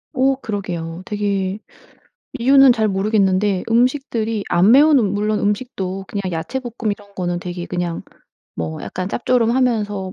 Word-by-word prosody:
어 265 +1 +3
그러게요. 180 -8 -5
되게 200 -2 -2 0.8
이유는 270 +1 +6
잘 220 -2 0
모르겠는데 195 -1 +1
음식들이 230 -3 0
안 185 +5 +4
매운 290 +2 +6
음 205 -4 +1
물론 210 +1 0
음식도 195 -3 -3
그냥 200 -1 -4
야채볶음 235 +6 -3
이런 205 0 -8
거는 175 -2 -2
되게 175 0 -6
그냥 175 -2 -3 0.5
뭐 80 -1 -5
약간 185 +1 -4
짭조름하면서 230 -5 0
205 Hz, 310 characters per minute, -19 LUFS, 185-240 Hz, 0.8 s, 이유는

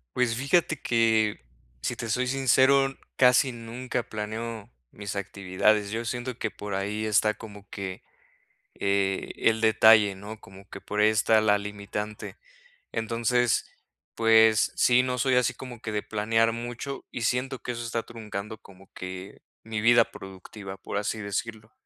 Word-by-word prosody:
Pues, 125 -2 +1
fíjate 150 +6 +2
que, 110 -2 +2 0.4
si - - -2
te 115 - -5
soy 125 +3 0
sincero, 135 +1 +4 0.2
casi 125 0 +4
nunca 120 +2 -4
planeo 110 0 -5 0.2
mis 100 -1 -6
actividades. 100 +1 +1
Yo 115 +3 -3
siento 120 +1 -4
que 110 - -3
por 105 -1 -7
ahí 105 +3 -2
está 105 0 +3
como 105 -2 -12
que, 95 -2 -6 0.7
eh, 100 -1 0
el 110 0 +2
detalle, 110 -2 +6
¿no? 105 +3 -9
Como 95 +1 -15
que 100 - -9
por 105 - -4
ahí 105 - +6
esta 110 0 +3
la 105 -1 +3
limitante. 105 +1 -6 0.6
Entonces, 115 +1 +1 0.5
pues, 110 -1 +5
sí, 125 0 +5
no 125 0 -2
soy 130 +1 +2
así 125 0 +2
como 120 -2 -9
que 110 - -5
de 105 -1 -2
planear 115 +1 +1
mucho, 120 +4 -6
y 120 - -5
siento 125 +3 -1
que 125 - -4
eso 120 0 -5
está 115 0 -3
truncando 110 -2 -7
como 95 0 -18
que 95 +1 -8 0.2
mi 110 -1 -3
vida 120 +1 +6
productiva, 95 +1 -9
por 100 - -4
así 105 +2 -2
decirlo. 105 +2 -5
110 Hz, 155 wpm, -27 LUFS, 105-120 Hz, 0.7 s, detalle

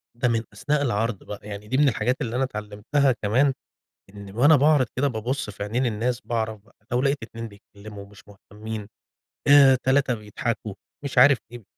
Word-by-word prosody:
ده 125 +2 0
من 115 -2 0
أثناء 150 0 -1
العرض 115 -5 -1
بقى، 105 - -8
يعني 105 0 -8
دي 130 - 0
من 145 0 +5
الحاجات 115 +2 0
اللي 120 -3 -3
أنا 130 - +1
اتعلّمتها 110 +4 0
كمان، 130 +7 +2 0.6
إن 100 -1 -10
وأنا 145 +6 +6
باعرِض 145 -2 +4
كده 140 +3 +2
بابُصّ 120 0 -3
في 100 - -8
عينين 120 +5 -1
الناس، 120 +3 -1
باعرف 110 -4 -3
بقى، 120 - -26 0.2
لو 125 +1 +1
لقيت 140 +1 +1
2 115 0 -7
بيتكلموا 100 0 -12
ومش 100 0 -16
مهتمين 105 +1 -9 0.6
آآ، 140 -2 +7
3 135 0 +2
بيضحكوا، 105 0 -4 0.3
مش 140 - -5
عارف 135 +1 +7
إيه، 120 -1 -10
115 Hz, 180 wpm, -24 LUFS, 105-135 Hz, 0.6 s, آآ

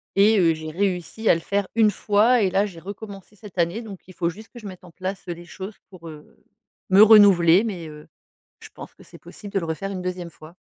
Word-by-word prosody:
Et, 205 +2 +4
heu, 165 -2 +3
j'ai 155 0 -8
réussi 185 +3 -3
à - - +7
le 165 - -5
faire 200 +1 -2
1 220 -2 +4
fois 215 +5 +2
et 190 - +2
là 195 +2 +1
j'ai 185 -5 -9
recommencé 200 +2 -10
cette 205 -2 -14
année, 175 +6 0
donc 200 -5 -10
il 185 - -13
faut 170 -1 -1
juste 215 +6 -11
que 240 - -10
je 215 - -14
mette 185 -1 -11
en 170 - -15
place, 190 +2 -6
heu, 175 - -3
les 170 +1 -12
choses 195 +3 -9
pour, 175 -3 -13
heu, 150 -1 -14 0.5
me 190 +2 +6
renouveler, 200 -4 +6
mais, 180 -7 -5
heu, 150 0 -13 0.5
je - - -13
pense - - -11
que - - -18
c'est - - -15
possible 205 -2 -12
de 195 - +1
le 165 - -5
refaire 195 +5 -4
une 185 -1 -5
2e 180 -1 -5
fois. 155 +1 -16
190 Hz, 245 wpm, -22 LUFS, 170-205 Hz, 0.5 s, à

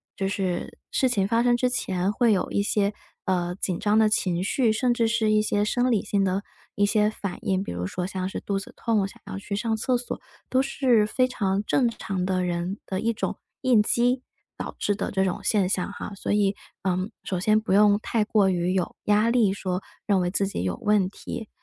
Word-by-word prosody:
就 195 - -1
是 190 -3 -2
事 260 - +2
情 200 -5 +1
发 230 +2 +2
生 240 0 +3
之 250 - +2
前 190 -5 -1
会 235 -2 +3
有 190 - -1
一 - - +1
些， 205 0 +1 0.3
呃， 180 -2 0
紧 185 -3 -2
张 210 +1 +2
的 215 -1 +5
情 180 -4 0
绪， 230 +2 +2
甚 245 +2 +2
至 230 -1 +2
是 225 -1 +2
一 215 0 +4
些 205 -1 +1
生 245 +3 +1
理 215 -2 +2
性 200 -1 +1
的 195 +1 0 0.3
一 205 - +3
些 210 0 +3
反 200 -3 -5
应， 190 -1 0
比 - - -6
如 90 +1 -3
说 180 - -3
像 185 -1 -3
是 - - -4
肚 200 -1 -2
子 195 - -10
痛 215 -4 +1
想 - - -16
要 - - -5
去 200 +1 -4
上 225 +1 0
厕 250 +3 +1
所， 245 - -5 0.3
都 260 - +3
是 255 -5 +3
非 255 +4 +1
常 200 -4 -1
正 245 +2 +2
常 195 -5 -3
的 185 -1 0
人 175 +3 -2
的 190 -1 -3
一 230 - +1
种 - - -3 0.2
应 250 -5 +5
激 245 +3 +2 0.4
导 - - -5
致 205 - +1
的 - - -3
这 190 -1 +1
种 185 -2 -1
现 200 -4 +2
象 190 0 -1
哈。 205 - -7
所 - - -3
以， 205 -1 +2 0.3
嗯， 185 +2 -1
首 185 - -2
先 215 +3 +3
不 215 - -4
用 205 0 +5
太 225 -2 0
过 205 -3 +3
于 180 0 0
有 185 -2 -1
压 210 +2 +3
力 230 -5 +3
说 185 -2 -3 0.2
认 200 -2 +3
为 175 0 0
自 200 0 +1
己 140 - -3
有 90 -2 -1
问 210 -3 +3
题。 220 +2 -7
205 Hz, 240 characters per minute, -25 LUFS, 190-225 Hz, 0.4 s, 的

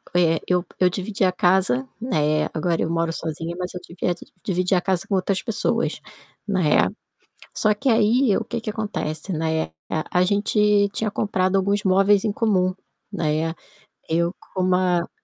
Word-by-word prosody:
eh, 165 -2 +3
eu 180 -1 +1
eu 185 - +5
dividia 190 0 -1
casa, 180 -8 +2 0.2
né, 155 -10 +1
agora 165 +1 0
eu - - 0
moro 165 0 0
sozinha 165 +1 -4
mas 180 0 -4
eu 180 - -6
divi 175 +1 -3 0.3
dividia 185 -1 +1
casa 185 0 -1
com 195 - -1
outras 190 +1 0
pessoas, 225 -4 -1 0.5
né. 185 -7 +3 0.7
Só 215 -1 +2
que 265 +6 -2
aí 225 0 +4
o 225 - -1
que 235 +1 -4
que 220 - -4
acontece, 195 -6 -4
né, 160 -1 0 0.3
eh, 155 - -1
a 180 - +2
gente 205 +1 +3
tinha 215 +1 -2
comprado 190 -2 0
alguns 200 +1 +1
móveis 195 +1 +4
em 215 - +1
comum, 190 -4 +1 0.4
né. 160 -3 0 0.6
Eu 170 +2 +1 0.2
com 185 - -1
uma 180 -2 +2
185 Hz, 160 wpm, -23 LUFS, 170-205 Hz, 0.7 s, eu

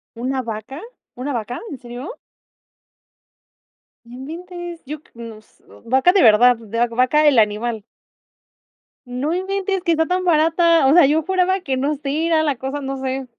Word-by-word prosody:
¿Una 260 +3 -2
vaca? 230 +6 -7 0.3
¿Una 270 +3 -4
vaca? 240 +1 -4
¿En 280 - -6
serio? 250 - -9 1.9
¡No 235 - -14
inventes! 345 +5 -8
Yo 295 +2 -7
cr - - -28
nos 225 -2 -12 0.2
¿vaca, 265 +9 +3
de 390 - +4
verdad, 240 +3 +6
d 225 -1 -15
de 240 - +3
vaca 255 +6 +2
el 285 -4 +4
animal? 220 +1 +1 1.2
¡No 255 +6 -3
inventes, 385 +1 -2
que 340 -3 +2
está 320 0 +1
tan 365 +2 -1
barata! 330 -1 +3
O 270 - +4
sea, 345 -2 +7
yo 310 +3 +2
juraba 375 +2 0
que 270 -7 -2
no 285 +3 -1
sé, 295 +3 -2
era 320 -2 +2
la 290 -4 -1
cosa, 270 +3 -5
no 270 0 -4
sé. 265 0 -4
275 Hz, 165 wpm, -20 LUFS, 245-335 Hz, 1.9 s, sea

